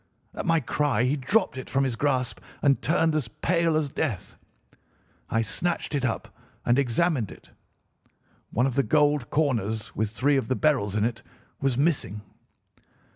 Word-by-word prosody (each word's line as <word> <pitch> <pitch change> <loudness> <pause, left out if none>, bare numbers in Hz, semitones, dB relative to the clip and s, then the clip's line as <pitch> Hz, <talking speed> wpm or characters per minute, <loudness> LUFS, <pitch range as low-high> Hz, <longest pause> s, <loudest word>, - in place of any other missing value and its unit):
At - - -5
my 165 -1 +4
cry 140 -3 0
he 130 +3 +2
dropped 150 - +1
it 130 - -8
from 135 +1 +1
his 130 -3 0
grasp 130 -1 0 0.2
and 140 -2 +3
turned 160 +5 +2
as 150 -6 0
pale 165 +7 +1
as 155 -2 0
death. 135 - -3 0.9
I 115 0 +1
snatched 170 +10 -1
it 140 -3 0
up 120 - -3 0.3
and 120 +3 +3
examined 135 - +1
it. - - -15 1.0
One 125 - +1
of 135 - 0
the 140 - +3
gold 145 -3 +2
corners, 110 -8 -1
with 110 0 0
three 135 +6 +2
of 130 - -1
the 130 - 0
beryls 130 -11 +1
in 105 0 +2
it, 120 -1 -2 0.4
was 135 -3 0
missing. 135 - +1
135 Hz, 165 wpm, -26 LUFS, 115-150 Hz, 1.0 s, my